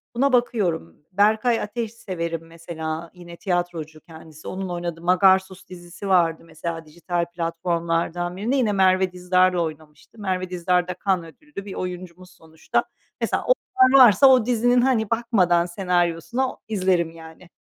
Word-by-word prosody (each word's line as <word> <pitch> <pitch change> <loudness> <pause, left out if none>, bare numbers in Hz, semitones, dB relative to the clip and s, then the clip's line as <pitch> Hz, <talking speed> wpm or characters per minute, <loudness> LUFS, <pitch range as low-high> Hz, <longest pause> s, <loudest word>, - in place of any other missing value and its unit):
buna 275 +2 +2
bakıyorum. 200 - 0 0.2
Berkay 215 +4 +2
Ateş 225 +1 -4
severim 170 -7 -5
mesela; 165 0 -6
yine 175 -1 -12
tiyatrocu 175 -4 -3
kendisi. 160 -1 -14
Onun 190 0 -5
oynadığı 175 -1 -5
Magarsus 190 +1 +2
dizisi 175 +2 -9
vardı 170 -4 +2
mesela, 165 0 -6
dijital 170 +2 -3
platformlardan 170 +1 -2
birinde. 225 +7 -1
Yine 245 -6 +2
Merve 190 -1 +3
Dizdar'la 180 0 +2
oynamıştı. 155 +5 -8
Merve 185 -2 -2
Dizdar 180 0 0
da 180 - -4
Cannes 170 -4 0
Ödüllü 295 -10 -10
bir 200 - -7
oyuncumuz 180 0 -7
sonuçta. 160 -2 -3 0.4
Mesela, - - -1
onlar 270 - +3
varsa, 230 +4 +6
o 255 -4 +5
dizinin, 245 +1 +2
hani, 240 -5 +1
bakmadan 200 -7 +2
senaryosuna 180 +7 -1
izlerim 185 -5 0
yani. 165 +1 -14
180 Hz, 135 wpm, -23 LUFS, 170-205 Hz, 0.4 s, varsa